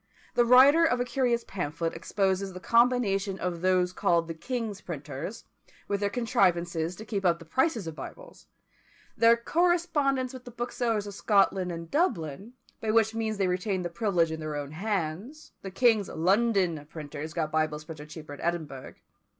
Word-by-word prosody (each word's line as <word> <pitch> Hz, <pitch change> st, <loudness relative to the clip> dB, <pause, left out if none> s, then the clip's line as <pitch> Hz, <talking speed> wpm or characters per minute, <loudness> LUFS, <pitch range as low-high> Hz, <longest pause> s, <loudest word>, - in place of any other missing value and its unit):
The 240 Hz, -, +4 dB
writer 270 Hz, +7 st, +7 dB
of 250 Hz, -7 st, +2 dB
a 245 Hz, -, 0 dB
curious 240 Hz, -1 st, 0 dB
pamphlet 165 Hz, -2 st, -3 dB
exposes 195 Hz, -1 st, -1 dB
the 185 Hz, -, -7 dB
combination 215 Hz, -4 st, +2 dB
of 175 Hz, -3 st, -3 dB
those 180 Hz, -1 st, +2 dB
called 170 Hz, -2 st, +1 dB
the 165 Hz, -, -4 dB
king's 220 Hz, +2 st, -4 dB
printers, 155 Hz, +4 st, -6 dB, 0.4 s
with 200 Hz, -, -1 dB
their 205 Hz, 0 st, 0 dB
contrivances 180 Hz, -8 st, +1 dB
to 220 Hz, -, -9 dB
keep 200 Hz, -3 st, -3 dB
up 175 Hz, -2 st, +3 dB
the 165 Hz, -, -13 dB
prices 235 Hz, -, 0 dB
of 160 Hz, -, -5 dB
Bibles; -, -, -10 dB, 0.7 s
their 230 Hz, 0 st, +5 dB
correspondence 295 Hz, -3 st, +1 dB
with 255 Hz, -1 st, -9 dB
the 245 Hz, -, -10 dB
booksellers 235 Hz, -2 st, -2 dB
of 205 Hz, -, -7 dB
Scotland 195 Hz, -3 st, +2 dB
and 165 Hz, -1 st, -7 dB
Dublin, 215 Hz, -, -1 dB, 0.3 s
by 220 Hz, -, -3 dB
which 220 Hz, 0 st, +3 dB
means 220 Hz, -1 st, -2 dB
they 195 Hz, -, +1 dB
retained 180 Hz, 0 st, -1 dB
the -, -, -2 dB
privilege 170 Hz, -3 st, +1 dB
in 160 Hz, -, -4 dB
their 155 Hz, -1 st, -4 dB
own 145 Hz, -1 st, -5 dB
hands: 195 Hz, -, -4 dB
the 195 Hz, -, -6 dB
king's 215 Hz, 0 st, +3 dB
London 185 Hz, -3 st, +1 dB
printers 155 Hz, 0 st, -7 dB
got 155 Hz, -3 st, -1 dB
Bibles 155 Hz, -1 st, 0 dB
printed 155 Hz, -1 st, -10 dB
cheaper 150 Hz, -1 st, -9 dB
at 145 Hz, -, -10 dB
Edinburgh. 155 Hz, -6 st, -4 dB
195 Hz, 170 wpm, -28 LUFS, 165-235 Hz, 0.7 s, writer